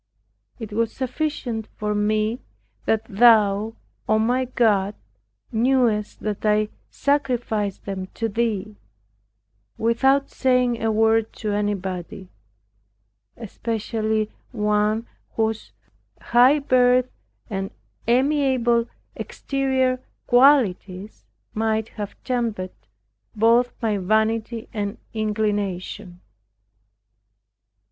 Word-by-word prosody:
It 220 -3 -7
was 225 +1 0
sufficient 255 -4 -3
for 210 0 -1
me 215 +3 0 0.5
that 220 0 +1
Thou, 215 -1 +4 0.3
O 215 - +4
my 245 +4 +1
God, 210 -5 +1 0.6
knewest 230 -3 +1
that 210 -1 -3
I 210 0 +2 0.2
sacrificed 245 -8 -1
them 190 -2 -4
to 225 - -1
Thee, 215 -2 -2 1.0
(without 265 +5 +2
saying 250 -3 +1
a 225 0 +1
word 225 0 +2
to 215 - -4
anybody) 190 -3 -3 1.1
especially 220 -1 -2 0.2
one 210 0 +1 0.3
whose 220 -1 -1 0.5
high 250 +5 +5
birth 255 -2 +3 0.4
and 195 -3 -3 0.4
amiable 255 -2 +2 0.3
exterior 265 -2 -1 0.3
qualities 220 -7 +3 0.3
might 220 0 0
have 205 -2 -7
tempted 230 -7 -2 0.6
both 230 +3 +4
my 215 -3 +1
vanity 220 +3 0
and 205 +1 -3 0.2
inclination. 205 -4 -2
220 Hz, 85 wpm, -23 LUFS, 210-245 Hz, 1.1 s, high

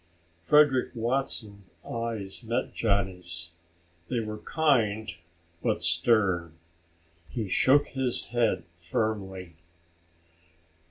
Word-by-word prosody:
Frederick 140 - +4
Watson's 115 -5 0 0.2
eyes 115 -4 -3
met 120 +2 -2
Johnny's. 90 -5 -1 0.6
They 125 - 0
were 110 -1 -5
kind 110 - +1 0.5
but - - -1
stern. 85 -1 +2 0.7
He 110 -4 -4
shook 140 +9 +4
his 130 -2 -1
head 120 -2 +1 0.2
firmly. 95 -1 -3
110 Hz, 85 wpm, -27 LUFS, 95-120 Hz, 0.7 s, Frederick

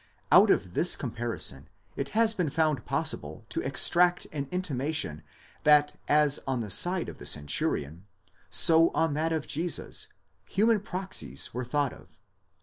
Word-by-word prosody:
Out - - +6
of 90 -2 0
this 175 - +3
comparison 115 - -4 0.3
it 140 - -4
has 225 -1 +3
been 180 -7 -2
found 155 -4 -1
possible 75 +1 -3
to - - -3
extract 175 0 +5
an 140 -2 -5
intimation 145 - -2 0.4
that 150 -1 +3
as 150 -1 +3
on 130 -2 -2
the 105 -3 -7
side 180 - +1
of - - -10
the - - -11
centurion, 75 +3 -3 0.4
so 165 -1 +6
on 160 -2 0
that 160 +2 -2
of 160 -2 -3
Jesus, 165 +3 -2 0.4
human 220 +2 +1
proxies 185 - -5
were 125 +2 -4
thought 140 +2 -2
of. - - -19
150 Hz, 145 wpm, -27 LUFS, 120-170 Hz, 0.4 s, Out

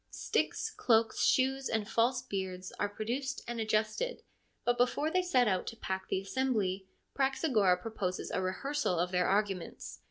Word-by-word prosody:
Sticks, - - -1
cloaks, 225 -1 +2
shoes, 265 +1 +2
and 220 -2 0
false 235 +4 +2
beards 185 -2 -4
are 205 - +1
produced 250 +6 -3
and 240 -1 -3
adjusted, 220 - 0 0.4
but 245 - +3
before 255 +5 +1
they 365 - +3
set 260 -10 +3
out 185 -3 0
to - - -4
pack 190 -3 -4
the - - +1
assembly 200 -4 -1 0.3
Praxagora 260 - +2
proposes 185 -3 -3
a - - 0
rehearsal 190 +3 -1
of 175 +2 0
their 180 -1 +2
arguments. 195 -3 -1
220 Hz, 155 wpm, -32 LUFS, 190-260 Hz, 0.4 s, but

